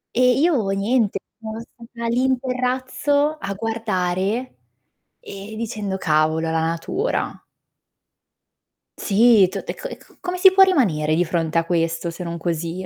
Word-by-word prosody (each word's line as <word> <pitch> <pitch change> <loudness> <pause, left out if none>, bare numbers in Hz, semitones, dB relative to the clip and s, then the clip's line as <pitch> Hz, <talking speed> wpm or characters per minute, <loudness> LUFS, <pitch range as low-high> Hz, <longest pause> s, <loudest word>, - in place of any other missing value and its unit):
e 250 +1 +4
io, 295 - +2
niente, 205 +2 +1 0.2
sono 220 0 -6
stata 235 0 -9
lì 245 +2 +1
in 260 -1 +2
terrazzo 260 +4 0
a 200 0 -4
guardare, 215 +1 -2 0.6
e 205 - -9
dicendo: 210 -4 -3
"Cavolo, 160 -1 +1
la 160 0 0
natura!" 165 - -2 1.5
Sì. 215 -1 +5
T - - -11
e - - -4
c - - -12
e - - -8
c - - -22
come 360 0 -4
si 375 +1 +7
può 385 +1 +7
rimanere 175 - +2
di 175 +2 +2
fronte 165 -1 -1
a 165 - +2
questo, 165 0 -1
se 170 +2 -7
non 170 -1 -5
così? 170 +2 -3
210 Hz, 150 wpm, -21 LUFS, 170-255 Hz, 1.5 s, si